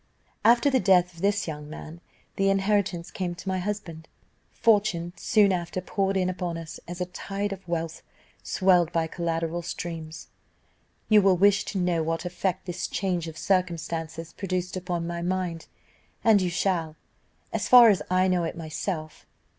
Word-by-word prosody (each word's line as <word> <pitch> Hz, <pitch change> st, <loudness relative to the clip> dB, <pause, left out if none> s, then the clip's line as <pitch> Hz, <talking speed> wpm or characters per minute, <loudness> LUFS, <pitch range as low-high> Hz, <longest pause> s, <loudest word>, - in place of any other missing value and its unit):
"After 240 Hz, +4 st, +5 dB
the 260 Hz, -, +3 dB
death 180 Hz, -2 st, +4 dB
of 165 Hz, -, -13 dB
this 200 Hz, -1 st, +1 dB
young 150 Hz, -2 st, -6 dB
man, 160 Hz, +2 st, -9 dB, 0.3 s
the 195 Hz, 0 st, +2 dB
inheritance 195 Hz, -3 st, 0 dB
came 180 Hz, -2 st, -3 dB
to 185 Hz, -, -11 dB
my 190 Hz, 0 st, 0 dB
husband. 180 Hz, -5 st, -5 dB, 0.4 s
Fortune 200 Hz, -6 st, +2 dB
soon 210 Hz, -4 st, +3 dB
after 180 Hz, 0 st, -2 dB
poured 195 Hz, +1 st, -1 dB
in 185 Hz, -1 st, +1 dB
upon 180 Hz, -2 st, -3 dB
us 165 Hz, -1 st, -8 dB
a 175 Hz, +1 st, -3 dB
tide 195 Hz, +2 st, -4 dB
of 190 Hz, -2 st, -11 dB
wealth, 165 Hz, -1 st, -3 dB, 0.4 s
swelled 180 Hz, -4 st, +3 dB
by 165 Hz, -1 st, +1 dB
collateral 165 Hz, 0 st, -2 dB
streams. 165 Hz, -2 st, -6 dB, 0.8 s
"You 215 Hz, -1 st, +6 dB
will 190 Hz, -2 st, +4 dB
wish 200 Hz, +2 st, +4 dB
to 205 Hz, -, -4 dB
know 175 Hz, -2 st, +1 dB
what 165 Hz, +2 st, -2 dB
effect 185 Hz, +1 st, -2 dB
this 180 Hz, -1 st, -3 dB
change 175 Hz, -3 st, -2 dB
of 160 Hz, -1 st, -8 dB
circumstances 165 Hz, -3 st, -2 dB
produced 185 Hz, -2 st, -3 dB
upon 175 Hz, -2 st, -3 dB
my 170 Hz, 0 st, -4 dB
mind, 175 Hz, -2 st, -2 dB, 0.6 s
and 215 Hz, -3 st, +5 dB
you 180 Hz, -, 0 dB
shall, 170 Hz, -3 st, -1 dB, 0.6 s
as -, -, -1 dB
far 245 Hz, -2 st, +9 dB
as 200 Hz, -, +3 dB
I 185 Hz, +1 st, +3 dB
know 180 Hz, -2 st, +1 dB
it 165 Hz, -, -4 dB
myself. 155 Hz, 0 st, -5 dB
180 Hz, 160 wpm, -26 LUFS, 165-195 Hz, 0.8 s, far